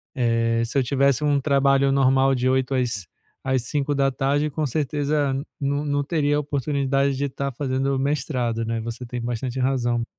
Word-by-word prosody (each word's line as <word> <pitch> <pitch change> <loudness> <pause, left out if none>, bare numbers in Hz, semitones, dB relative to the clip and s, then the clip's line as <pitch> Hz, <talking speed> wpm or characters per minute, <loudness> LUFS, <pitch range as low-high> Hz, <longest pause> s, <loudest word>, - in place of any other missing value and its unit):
Eh, 115 -2 +1
se 120 - -3
eu 135 - +3
tivesse 140 +1 +2
um 145 -1 +2
trabalho 140 -1 +3
normal 135 0 +3
de 125 +1 +1
8h 130 0 +1
às 115 -8 -1 0.4
às 130 -2 +1
17h 140 +1 0
com 155 +1 -2
certeza 145 0 0 0.3
no 140 +2 -1
no 145 0 0
teria 145 -1 +1
oportunidade 140 -1 0
de 140 +2 -1
estar 140 0 -3
fazendo 135 +1 -1
o - - -1
mestrado, 125 -5 -1
né? 115 0 -2
Você 115 +2 -6
tem 120 0 -5
bastante 120 +2 -3
razão. 120 -3 0
135 Hz, 165 wpm, -23 LUFS, 125-140 Hz, 0.4 s, eu